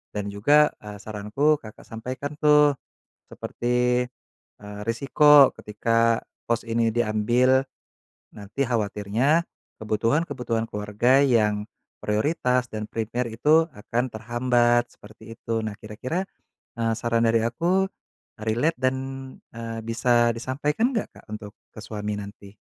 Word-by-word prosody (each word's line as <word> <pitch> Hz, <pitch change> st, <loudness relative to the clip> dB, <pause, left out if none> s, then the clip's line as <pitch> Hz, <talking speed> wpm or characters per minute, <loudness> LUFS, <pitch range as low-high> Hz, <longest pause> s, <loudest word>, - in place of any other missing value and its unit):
Dan 100 Hz, -1 st, -3 dB
juga, 145 Hz, +9 st, +4 dB
eee, 105 Hz, 0 st, -9 dB
saranku 110 Hz, +9 st, 0 dB
Kakak 110 Hz, -1 st, -13 dB
sampaikan 130 Hz, +6 st, -6 dB
tuh 150 Hz, -1 st, +5 dB, 0.6 s
seperti, 125 Hz, +1 st, 0 dB, 0.6 s
eee, 105 Hz, 0 st, -9 dB
resiko 140 Hz, +4 st, +6 dB
ketika 115 Hz, +2 st, +1 dB, 0.2 s
pos 115 Hz, 0 st, 0 dB
ini 115 Hz, -1 st, +1 dB
diambil, 120 Hz, +4 st, +2 dB, 0.7 s
nanti 110 Hz, +6 st, -3 dB
khawatirnya 115 Hz, -, +1 dB, 0.3 s
kebutuhan-kebutuhan 115 Hz, +1 st, -1 dB
keluarga 110 Hz, +6 st, +2 dB
yang 105 Hz, -5 st, +2 dB, 0.4 s
prioritas 125 Hz, +2 st, +1 dB
dan 110 Hz, -1 st, -5 dB
prepare 115 Hz, +2 st, -2 dB
itu 155 Hz, +8 st, +4 dB
akan 120 Hz, +4 st, -3 dB
terhambat, 120 Hz, +1 st, +1 dB
seperti 110 Hz, +2 st, -13 dB
itu. 115 Hz, -1 st, -2 dB
Nah, 110 Hz, -, -3 dB
kira-kira, 125 Hz, -, -4 dB, 0.6 s
eee, 115 Hz, -1 st, +1 dB
saran 115 Hz, 0 st, 0 dB
dari 115 Hz, 0 st, +2 dB
aku 175 Hz, +11 st, +1 dB, 0.6 s
relate 120 Hz, +9 st, 0 dB
dan, 130 Hz, 0 st, +1 dB, 0.6 s
eee, 115 Hz, 0 st, -6 dB
bisa 120 Hz, +1 st, +2 dB
disampaikan 145 Hz, -, -1 dB
enggak, 220 Hz, -, -1 dB
Kak, -, -, -29 dB
untuk 105 Hz, -1 st, -7 dB, 0.2 s
ke -, -, -20 dB
suami 105 Hz, -1 st, -4 dB
nanti? 100 Hz, 0 st, -11 dB
115 Hz, 115 wpm, -24 LUFS, 110-130 Hz, 0.7 s, resiko